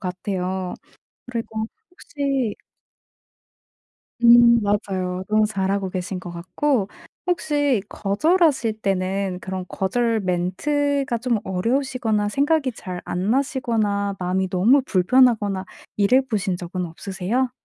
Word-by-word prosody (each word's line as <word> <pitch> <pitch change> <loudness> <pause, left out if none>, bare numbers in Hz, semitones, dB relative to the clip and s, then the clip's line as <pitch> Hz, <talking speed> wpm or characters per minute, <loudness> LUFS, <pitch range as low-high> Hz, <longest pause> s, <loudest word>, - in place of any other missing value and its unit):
같아요. 185 0 -3 0.6
그리고 225 -2 -3 0.2
혹시 275 -9 -2 1.7
음 235 0 +7
맞아요. 190 -3 -1
너무 215 0 +3
잘하고 195 -1 -1
계신 185 +1 -4
것 175 - -8
같고 190 +7 -1 0.4
혹시 290 - +1
거절하실 235 - +1
때는 190 -1 -1
그런 185 -1 -5
거절 225 +3 0
멘트가 245 +10 0
좀 240 -1 0
어려우시거나 225 +1 0
생각이 280 +3 +1
잘 185 -5 -7
안 185 +4 -2
나시거나 220 -7 0
마음이 185 +1 -1
너무 225 +10 +4
불편하거나 205 -2 +3 0.3
이래 210 +6 +4
보신 205 -8 -2
적은 180 +1 -4
없으세요? 195 +9 -2
205 Hz, 250 characters per minute, -22 LUFS, 185-255 Hz, 1.7 s, 음